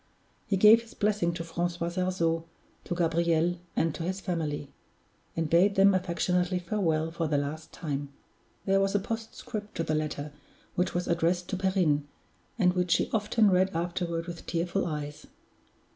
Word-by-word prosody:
He 200 Hz, -3 st, +1 dB
gave 215 Hz, +4 st, +8 dB
his 230 Hz, -, -15 dB
blessing 205 Hz, -4 st, +1 dB
to 170 Hz, -, -4 dB
Francois 170 Hz, +1 st, -2 dB
Sarzeau, 170 Hz, -2 st, 0 dB, 0.4 s
to 175 Hz, -, -2 dB
Gabriel, 170 Hz, 0 st, +1 dB, 0.2 s
and 165 Hz, -1 st, +1 dB
to -, -, -7 dB
his 185 Hz, +3 st, -2 dB
family; 155 Hz, -7 st, -3 dB, 0.6 s
and 165 Hz, -1 st, 0 dB
bade 180 Hz, +5 st, +4 dB
them 195 Hz, +1 st, +6 dB
affectionately 180 Hz, 0 st, +1 dB
farewell 170 Hz, -4 st, 0 dB
for 165 Hz, -1 st, -2 dB
the 150 Hz, -1 st, +1 dB
last 150 Hz, +3 st, -4 dB
time. 145 Hz, -3 st, -4 dB, 0.6 s
There 195 Hz, 0 st, +3 dB
was 195 Hz, +1 st, +1 dB
a -, -, +4 dB
postscript 225 Hz, 0 st, -6 dB
to 165 Hz, -, -1 dB
the 155 Hz, -, -1 dB
letter, 150 Hz, -1 st, -2 dB, 0.4 s
which 180 Hz, 0 st, 0 dB
was 175 Hz, 0 st, -1 dB
addressed 170 Hz, +1 st, +1 dB
to 195 Hz, -, -1 dB
Perrine, 180 Hz, -7 st, +1 dB, 0.5 s
and 180 Hz, -5 st, +4 dB
which 180 Hz, -1 st, 0 dB
she -, -, +2 dB
often 215 Hz, -1 st, +3 dB
read 185 Hz, +1 st, +2 dB
afterward 170 Hz, 0 st, -2 dB
with 170 Hz, -1 st, -8 dB
tearful 175 Hz, +3 st, -1 dB
eyes. 150 Hz, -2 st, -5 dB
175 Hz, 160 wpm, -29 LUFS, 165-190 Hz, 0.6 s, gave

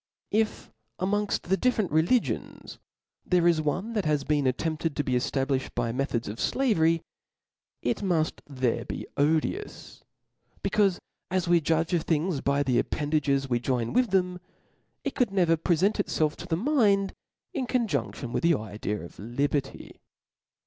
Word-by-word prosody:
If 215 Hz, +1 st, 0 dB, 0.3 s
amongft 205 Hz, +3 st, 0 dB
the 190 Hz, +2 st, +1 dB
difitrent 225 Hz, -7 st, +1 dB
religions, 165 Hz, +11 st, 0 dB, 0.4 s
there 180 Hz, -1 st, +3 dB
is 165 Hz, -2 st, +3 dB
one 190 Hz, +9 st, -2 dB
that 210 Hz, -4 st, 0 dB
has 150 Hz, -2 st, +1 dB
been 145 Hz, -2 st, +1 dB
attempted 155 Hz, +3 st, -1 dB
to 145 Hz, -, 0 dB
be 130 Hz, -, -3 dB
eftabKfhed 135 Hz, +2 st, 0 dB
by 115 Hz, -1 st, 0 dB
me 135 Hz, +4 st, 0 dB
thods 120 Hz, -4 st, -3 dB
of 105 Hz, -, -5 dB
fiavery, 165 Hz, -, +2 dB, 0.8 s
it -, -, +1 dB
muft 175 Hz, -6 st, 0 dB
there 130 Hz, -4 st, -1 dB
be -, -, -5 dB
odious; 160 Hz, -, -1 dB, 0.6 s
becaufe 195 Hz, -4 st, +2 dB, 0.3 s
as 185 Hz, -1 st, 0 dB
we 170 Hz, -1 st, +4 dB
judge, 165 Hz, +2 st, +1 dB
of 170 Hz, -, +3 dB
things 160 Hz, -1 st, 0 dB
by 140 Hz, +1 st, +1 dB
the 125 Hz, -3 st, +2 dB
appendages 145 Hz, -2 st, 0 dB
we 120 Hz, -2 st, +1 dB
join 120 Hz, -2 st, -1 dB
with 250 Hz, -2 st, +3 dB
them, 180 Hz, -1 st, +1 dB, 0.6 s
it -, -, -2 dB
could 250 Hz, -5 st, +1 dB
never 175 Hz, -4 st, +3 dB
prefent 175 Hz, +5 st, +1 dB
itfelf 155 Hz, -7 st, 0 dB
to 175 Hz, -, -8 dB
the 160 Hz, -2 st, 0 dB
mind 205 Hz, -, +2 dB, 0.4 s
in 260 Hz, -3 st, -2 dB
conjun£tion 145 Hz, -, -1 dB
with -, -, -1 dB
the 170 Hz, -1 st, +4 dB
idea 105 Hz, -2 st, -4 dB
of 85 Hz, -, -12 dB
liberty. 135 Hz, +6 st, -3 dB
160 Hz, 155 wpm, -27 LUFS, 140-190 Hz, 0.8 s, we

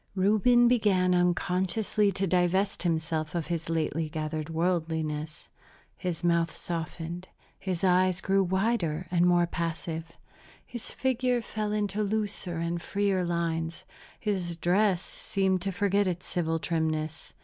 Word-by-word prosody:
Reuben 215 Hz, +5 st, +4 dB
began 200 Hz, -7 st, +3 dB
unconsciously 185 Hz, +4 st, +1 dB
to 195 Hz, -, 0 dB
divest 185 Hz, +2 st, +1 dB
himself 160 Hz, -2 st, -1 dB
of 170 Hz, -3 st, -1 dB
his 165 Hz, -2 st, -3 dB
lately 160 Hz, -1 st, -1 dB
gathered 155 Hz, 0 st, -3 dB
worldliness; 160 Hz, -2 st, -2 dB, 0.5 s
his 175 Hz, -3 st, -4 dB
mouth 170 Hz, -1 st, +2 dB
softened, 170 Hz, +1 st, -4 dB, 0.3 s
his 185 Hz, -3 st, -3 dB
eyes 185 Hz, 0 st, +4 dB
grew 195 Hz, +1 st, +2 dB
wider 185 Hz, -3 st, 0 dB
and 175 Hz, 0 st, +4 dB
more 175 Hz, -1 st, +4 dB
passive, 165 Hz, -1 st, -4 dB, 0.5 s
his 240 Hz, -2 st, -6 dB
figure 255 Hz, -1 st, 0 dB
fell 215 Hz, -1 st, -3 dB
into 210 Hz, -1 st, -1 dB
looser 205 Hz, -4 st, -1 dB
and 170 Hz, +1 st, -2 dB
freer 200 Hz, 0 st, 0 dB
lines, 170 Hz, 0 st, -2 dB, 0.3 s
his 185 Hz, -5 st, -1 dB
dress 180 Hz, +2 st, +2 dB
seemed 190 Hz, -2 st, -1 dB
to 195 Hz, +1 st, -1 dB
forget 200 Hz, +1 st, +1 dB
its 180 Hz, -1 st, -3 dB
civil 165 Hz, -2 st, -1 dB
trimness. 160 Hz, -1 st, -2 dB
180 Hz, 125 wpm, -28 LUFS, 165-195 Hz, 0.5 s, Reuben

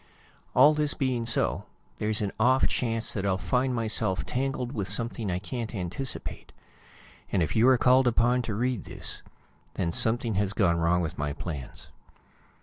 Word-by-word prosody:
All 145 Hz, +4 st, +7 dB
this 150 Hz, -1 st, 0 dB
being 125 Hz, -4 st, -1 dB
so, 85 Hz, -, +1 dB, 0.3 s
there's 110 Hz, 0 st, +1 dB
an 100 Hz, -, -2 dB
off 130 Hz, +4 st, +4 dB
chance 115 Hz, -2 st, -1 dB
that 100 Hz, -, -3 dB
I'll 95 Hz, -2 st, +1 dB
find 130 Hz, +5 st, 0 dB
myself 110 Hz, -4 st, -1 dB
tangled 130 Hz, -1 st, -2 dB
with 100 Hz, -8 st, -3 dB
something 115 Hz, 0 st, -1 dB
I 90 Hz, -, 0 dB
can't 115 Hz, +4 st, -5 dB
anticipate. 95 Hz, +8 st, -5 dB, 0.8 s
And 95 Hz, -4 st, +2 dB
if 80 Hz, -, -3 dB
you 115 Hz, +2 st, +5 dB
are 130 Hz, -1 st, +6 dB
called 130 Hz, +1 st, +4 dB
upon 120 Hz, +1 st, +3 dB
to 115 Hz, -3 st, -4 dB
read 125 Hz, -1 st, -1 dB
this, -, -, -4 dB, 0.5 s
then 85 Hz, -2 st, -1 dB
something 115 Hz, +5 st, +2 dB
has 100 Hz, -1 st, -2 dB
gone 85 Hz, -6 st, +2 dB
wrong 85 Hz, +1 st, +2 dB
with 85 Hz, 0 st, -4 dB
my 75 Hz, 0 st, -1 dB
plans. 75 Hz, -6 st, -7 dB
110 Hz, 165 wpm, -27 LUFS, 95-125 Hz, 0.8 s, All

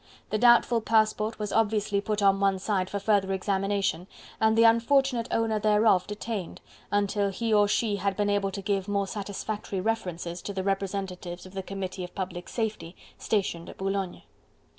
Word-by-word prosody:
The 215 Hz, -, 0 dB
doubtful 240 Hz, 0 st, +5 dB
passport 220 Hz, 0 st, +1 dB
was 210 Hz, -2 st, -4 dB
obviously 210 Hz, -2 st, +1 dB
put 210 Hz, 0 st, -1 dB
on 195 Hz, 0 st, +4 dB
one 195 Hz, -1 st, +2 dB
side 190 Hz, -1 st, -1 dB
for 205 Hz, -, -3 dB
further 200 Hz, -1 st, +1 dB
examination, 195 Hz, -2 st, -1 dB, 0.3 s
and 220 Hz, 0 st, +3 dB
the 230 Hz, -, +6 dB
unfortunate 235 Hz, +1 st, +3 dB
owner 225 Hz, -1 st, +1 dB
thereof 210 Hz, -3 st, +3 dB
detained, 210 Hz, -2 st, -5 dB, 0.3 s
until 205 Hz, 0 st, +1 dB
he 225 Hz, +3 st, -1 dB
or 205 Hz, -1 st, +5 dB
she 210 Hz, 0 st, +1 dB
had 195 Hz, 0 st, -1 dB
been 205 Hz, -1 st, +1 dB
able 205 Hz, -1 st, +1 dB
to 195 Hz, 0 st, -6 dB
give 195 Hz, -1 st, -1 dB
more 200 Hz, -1 st, 0 dB
satisfactory 205 Hz, 0 st, -4 dB
references 180 Hz, -5 st, -3 dB
to 200 Hz, -, -5 dB
the 190 Hz, -1 st, -3 dB
representatives 190 Hz, -2 st, -3 dB
of 185 Hz, -, -12 dB
the 195 Hz, -, -3 dB
Committee 190 Hz, -1 st, -5 dB
of 180 Hz, -, -9 dB
Public 180 Hz, -2 st, -5 dB
Safety, 215 Hz, -6 st, -3 dB, 0.2 s
stationed 180 Hz, -5 st, -1 dB
at -, -, -11 dB
Boulogne. 195 Hz, -1 st, -3 dB
200 Hz, 170 wpm, -27 LUFS, 190-215 Hz, 0.3 s, the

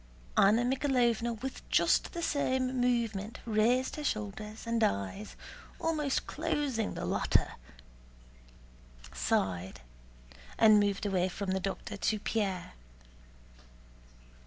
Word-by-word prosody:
Anna 215 Hz, +5 st, +5 dB
Mikháylovna 245 Hz, -3 st, +1 dB
with 265 Hz, -, -4 dB
just -, -, +3 dB
the 340 Hz, -1 st, -4 dB
same 260 Hz, -4 st, 0 dB
movement 230 Hz, -3 st, 0 dB
raised 235 Hz, +5 st, +2 dB
her 300 Hz, -, -4 dB
shoulders 215 Hz, -2 st, -4 dB
and 230 Hz, -1 st, +1 dB
eyes, 100 Hz, -, -2 dB, 0.4 s
almost 300 Hz, -4 st, 0 dB
closing 290 Hz, -8 st, -2 dB
the -, -, -4 dB
latter, -, -, +1 dB, 1.6 s
sighed, 90 Hz, -7 st, -1 dB, 0.8 s
and 215 Hz, -1 st, +7 dB
moved 205 Hz, 0 st, 0 dB
away 185 Hz, -2 st, +1 dB
from 195 Hz, +1 st, -3 dB
the 190 Hz, -, 0 dB
doctor 195 Hz, +2 st, -4 dB
to 215 Hz, +1 st, 0 dB
Pierre. 195 Hz, -5 st, -2 dB
220 Hz, 105 wpm, -31 LUFS, 200-255 Hz, 1.6 s, and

